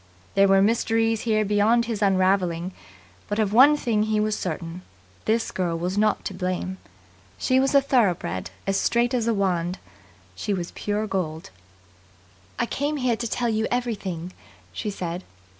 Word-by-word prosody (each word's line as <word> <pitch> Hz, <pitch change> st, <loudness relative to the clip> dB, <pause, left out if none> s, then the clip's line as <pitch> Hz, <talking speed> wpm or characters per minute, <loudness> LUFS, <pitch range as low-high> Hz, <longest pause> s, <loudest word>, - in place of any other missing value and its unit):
There 195 Hz, 0 st, +5 dB
were 195 Hz, 0 st, +5 dB
mysteries 225 Hz, 0 st, +1 dB
here 215 Hz, -1 st, +2 dB
beyond 210 Hz, +4 st, +3 dB
his 225 Hz, -2 st, -3 dB
unravelling, 185 Hz, -3 st, +2 dB, 0.6 s
but 205 Hz, -, -2 dB
of 210 Hz, -2 st, +1 dB
one 280 Hz, +6 st, +7 dB
thing 225 Hz, -6 st, 0 dB
he 215 Hz, 0 st, +1 dB
was 215 Hz, 0 st, +1 dB
certain: 170 Hz, 0 st, -5 dB, 0.4 s
this 225 Hz, +1 st, +1 dB
girl 175 Hz, -3 st, -1 dB
was 180 Hz, +3 st, -2 dB
not 215 Hz, 0 st, +1 dB
to -, -, -3 dB
blame. 185 Hz, 0 st, -3 dB, 0.6 s
She 255 Hz, -, +2 dB
was 270 Hz, +1 st, +2 dB
a 280 Hz, -, +7 dB
thoroughbred, 185 Hz, -, +1 dB, 0.2 s
as 195 Hz, 0 st, +1 dB
straight 240 Hz, +2 st, +1 dB
as 235 Hz, -2 st, 0 dB
a 230 Hz, -, +3 dB
wand. 180 Hz, -2 st, 0 dB, 0.6 s
She 195 Hz, -, -2 dB
was 175 Hz, -2 st, -4 dB
pure 210 Hz, +1 st, -2 dB
gold. 170 Hz, -, -3 dB, 1.1 s
"I -, -, +1 dB
came 290 Hz, +5 st, -2 dB
here 250 Hz, -3 st, +1 dB
to 235 Hz, +1 st, -3 dB
tell 240 Hz, +1 st, -1 dB
you 220 Hz, 0 st, 0 dB
everything," 195 Hz, -8 st, -3 dB, 0.4 s
she 215 Hz, -, -3 dB
said. 180 Hz, -2 st, -4 dB
205 Hz, 160 wpm, -24 LUFS, 185-230 Hz, 1.1 s, one